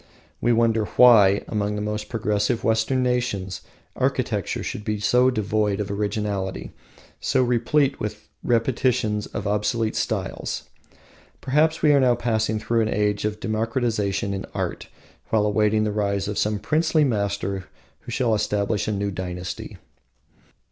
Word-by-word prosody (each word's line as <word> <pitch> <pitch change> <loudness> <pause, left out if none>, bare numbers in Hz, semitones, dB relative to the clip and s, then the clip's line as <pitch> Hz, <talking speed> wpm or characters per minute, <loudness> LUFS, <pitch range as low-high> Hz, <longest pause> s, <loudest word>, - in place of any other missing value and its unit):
We 120 - +2
marvel 115 -2 +2
why, 105 -5 +7
among 105 -1 -1
the 105 - -3
most 105 0 -4
progressive 105 0 0
Western 115 +4 +1
nations, 120 -7 -1 0.3
architecture - - -1
should 105 - -5
be 105 -1 -2
so 125 +4 +4
devoid 105 -3 0
of 100 -1 -3
originality, 100 -2 -3 0.5
so 130 - +2
replete 130 +4 +1
with 105 0 -5 0.2
repetitions 115 -3 +1
of 100 - -6
obsolete 105 +2 0
styles. - - -3 0.8
Perhaps 155 +4 +1
we 150 -1 +6
are 130 -3 +4
passing 110 -2 0
through 115 +2 0
an 110 - 0
age 105 0 0
of 105 0 -2
democratisation 110 -3 -1
in 95 - -5
art, - - -3 0.4
while 110 -2 +2
awaiting 105 +1 +2
the 105 - 0
rise 100 -1 -1
of 105 - -3
some 105 0 +1
princely 155 +8 +2
master 100 -5 -1 0.3
who - - -10
shall 120 -3 +1
establish 105 0 0
a - - 0
new 100 0 -1
dynasty. 90 -1 -6
105 Hz, 140 wpm, -23 LUFS, 105-120 Hz, 0.8 s, why